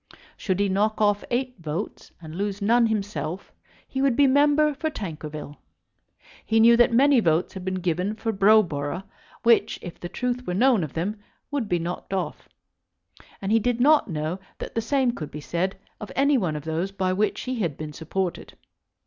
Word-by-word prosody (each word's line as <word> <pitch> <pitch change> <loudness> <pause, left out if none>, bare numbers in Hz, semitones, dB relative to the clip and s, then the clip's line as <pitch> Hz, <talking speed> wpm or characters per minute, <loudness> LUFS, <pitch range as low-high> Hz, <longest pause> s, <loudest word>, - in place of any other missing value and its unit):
Should 185 -2 -2
he 200 - +3
knock 205 +3 +1
off 205 -1 +2
eight 250 0 -1
votes 165 +5 -5
and 160 -2 -10
lose 200 +2 -3
none 230 +3 +4
himself, 195 -6 -3 0.4
he 265 - -3
would 270 -3 +3
be 285 - +5
member 290 +2 +4
for 315 +3 -2
Tankerville. 155 - -7 0.9
He 225 0 +2
knew 235 +1 +7
that 240 0 +5
many 270 +2 +5
votes 165 -4 +1
had 190 - -7
been 185 0 -2
given 180 +4 -1
for 225 0 -2
Browborough 195 -6 +3 0.4
which, 230 -1 +4
if 175 - -8
the 175 - -6
truth 250 +5 -3
were 180 - -1
known 240 -2 +4
of 150 - -6
them, 200 +6 -2 0.3
would 270 -7 -2
be 175 - +2
knocked 175 +3 -4
off; 185 - -4 0.9
and 195 - -1
he 225 - +5
did 245 +1 0
not 295 -1 +4
know 160 +2 -3 0.2
that - - -7
the 225 - 0
same 260 +1 +1
could 155 -10 -6
be 150 - -7
said 175 +6 -2 0.2
of 210 - -8
any 280 +1 +3
one 180 - 0
of 150 - -5
those 165 +5 -2
by 190 -2 -1
which 210 +3 0
he 255 -2 -3
had 170 -9 -1
been 155 -1 -6
supported. 175 +4 -4
200 Hz, 190 wpm, -25 LUFS, 170-240 Hz, 0.9 s, knew